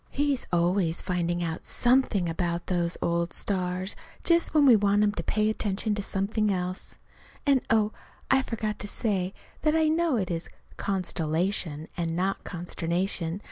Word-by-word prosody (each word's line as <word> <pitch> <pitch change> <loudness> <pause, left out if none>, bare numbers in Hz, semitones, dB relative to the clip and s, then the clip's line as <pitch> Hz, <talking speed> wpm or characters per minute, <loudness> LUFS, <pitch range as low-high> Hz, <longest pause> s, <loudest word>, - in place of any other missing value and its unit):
He's 285 -2 0
always 175 -1 +2
finding 175 -1 -1
out 165 0 -3
something 240 -7 +2
about 170 +1 -2
those 175 -2 0
old 170 0 0
stars 185 0 -2 0.3
just 335 -1 +4
when 300 -2 +5
we 255 -4 +8
want 205 0 +3
him 205 - +3
to 210 - -4
pay 215 0 +1
attention 210 0 0
to 205 - -1
something 205 +2 0
else. 185 0 -3 0.5
And, 275 -3 +4
oh, 220 -2 +3 0.4
I 265 0 +5
forgot 215 -4 -3
to 205 - -4
say 195 -4 0 0.3
that 305 0 +2
I 320 -1 +3
know 325 -2 +2
it 190 -6 -1
is 165 0 -3 0.3
"constellation," 165 -3 -1
and 165 -1 -2
not 190 +3 -1
"consternation." 175 0 -2
195 Hz, 155 wpm, -27 LUFS, 175-220 Hz, 0.5 s, we